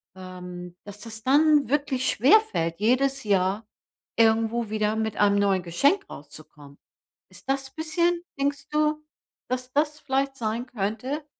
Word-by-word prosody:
Ähm, 180 -1 -9
dass 205 0 -11
das 220 -1 -9
dann 295 0 +4
wirklich 280 -2 0
schwerfällt, 265 - +3
jedes 265 +5 +1
Jahr 200 +1 0 0.5
irgendwo 225 0 +2
wieder 215 0 0
mit 220 -1 -2
einem 205 -1 +3
neuen 195 -2 +2
Geschenk 280 - +1
rauszukommen. 145 -1 -12 0.5
Ist 185 +5 -15
das 270 0 -1
bisschen 340 +2 0 0.2
denkst 280 0 -1
du, 305 0 0 0.5
dass 255 0 -3
das 300 +1 0
vielleicht 275 -1 -1
sein 230 +1 -2
könnte? 250 +7 -3
235 Hz, 130 wpm, -25 LUFS, 200-280 Hz, 0.5 s, dann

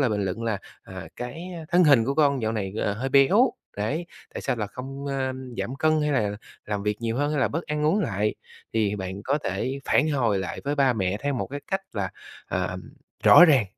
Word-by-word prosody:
lời 130 -4 +3
bình 105 -2 0
luận 95 +5 -3
là, 110 -3 -1 0.2
à, 95 -3 -9
"Cái, 125 +8 -6 0.2
a, - - -8
thân 175 +1 +5
hình 140 -7 +6
của 135 - -1
con 140 -5 +3
dạo 110 - 0
này, 100 -4 -3
ờ, 105 - 0
hơi 125 +5 -3
béo, 140 - +5 0.3
đấy, 140 +12 -2 0.3
tại - - -4
sao 130 -3 0
là 105 - -2
không, 135 +5 -7
a, 135 -1 -1 0.3
giảm 130 - -3
cân, 155 +1 +2
hay 150 - +1
là 105 -5 0 0.3
làm 105 -1 -2
việc 105 0 0
nhiều 115 0 -2
hơn, 145 +2 +1
hay 150 - 0
là - - +3
bớt 165 +3 -2
ăn 150 0 -1
uống 195 +7 +3
lại?" 105 - 0 0.4
Thì 105 -2 +1
bạn 95 0 -5
có 140 +3 +1
thể 135 +2 -2
phản 155 - +3
hồi 120 -8 +1
lại 95 -1 -4
với 145 +1 0
ba 135 -3 +3
mẹ 95 -3 -1
theo 140 0 0
một 125 - -2
cái 145 +1 -6
cách 195 0 +1
là, - - -2 0.4
ờm, - - -2 0.4
rõ 175 - +10
ràng. 140 -9 +5
130 Hz, 235 wpm, -25 LUFS, 105-145 Hz, 0.4 s, rõ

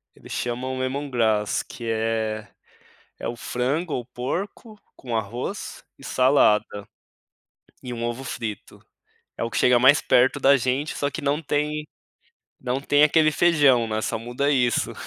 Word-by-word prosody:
Ele - - -15
chamam 130 +2 -3
Lemongrass 125 -6 0
que 120 - -10
é 110 -1 -1 0.7
é - - -4
o 120 - -4
frango 140 +8 -2
ou 125 - -3
porco 190 - -5 0.2
com 120 -3 -6
arroz 110 +3 -4
e - - -16
salada 105 -6 +2 0.9
e 125 - -6
um 115 - -5
ovo 120 +3 -3
frito. 110 -5 -6 0.6
É - - -2
o 115 - -2
que 105 - -3
chega 125 +2 +5
mais 130 +4 +5
perto 130 +3 +3
da 140 +1 +5
gente, 130 +4 -2
só 145 - 0
que - - -6
não 145 +2 0
tem 150 0 -2 0.7
não 130 +1 -2
tem 145 +1 +3
aquele 155 +1 +4
feijão, 145 -8 +4
né. 110 0 -1
Só - - -2
muda 120 +5 -1
isso. 125 -4 +1
125 Hz, 150 wpm, -24 LUFS, 115-145 Hz, 0.9 s, chega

